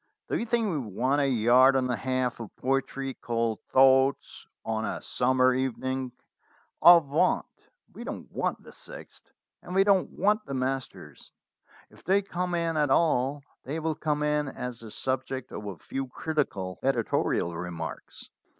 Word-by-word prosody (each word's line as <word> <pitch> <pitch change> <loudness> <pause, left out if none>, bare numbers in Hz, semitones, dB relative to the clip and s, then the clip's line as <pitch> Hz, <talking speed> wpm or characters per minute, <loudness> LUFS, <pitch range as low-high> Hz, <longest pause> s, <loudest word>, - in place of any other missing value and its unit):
Do - - 0
you 235 - -3
think 230 -1 +1
we 165 -7 -1
want 130 +5 0
a 140 - +2
yard 125 +2 +5
and 130 -1 +2
a - - +1
half 130 -1 -1
of 115 -3 -9
poetry 135 0 -2
called 115 -3 -2
'Thoughts 130 +1 +3 0.2
on 110 0 -1
a - - -3
Summer 130 0 +2
Evening'? 130 0 -2 0.7
Avaunt! 170 0 +5 0.5
We - - -8
don't - - -7
want - - -2
the - - -13
sixth, - - -12 0.3
and 180 - -7
we 195 - +6
don't 195 -2 +3
want 210 +3 +1
the 140 - -4
masters. 130 +1 -4 0.6
If - - -19
they 195 +3 +2
come 180 -2 -2
in 165 -2 -1
at 150 -2 +2
all, 140 -2 +2 0.2
they 150 +5 -4
will 160 0 -1
come 150 -1 -1
in 150 0 +1
as 125 -3 -6
the 115 - -10
subject 130 +2 -3
of 105 0 -6
a 95 -4 -6
few 135 0 -5
critical 125 -11 -3
editorial 115 -9 0
remarks. 85 -1 -7
135 Hz, 160 wpm, -27 LUFS, 125-155 Hz, 0.7 s, we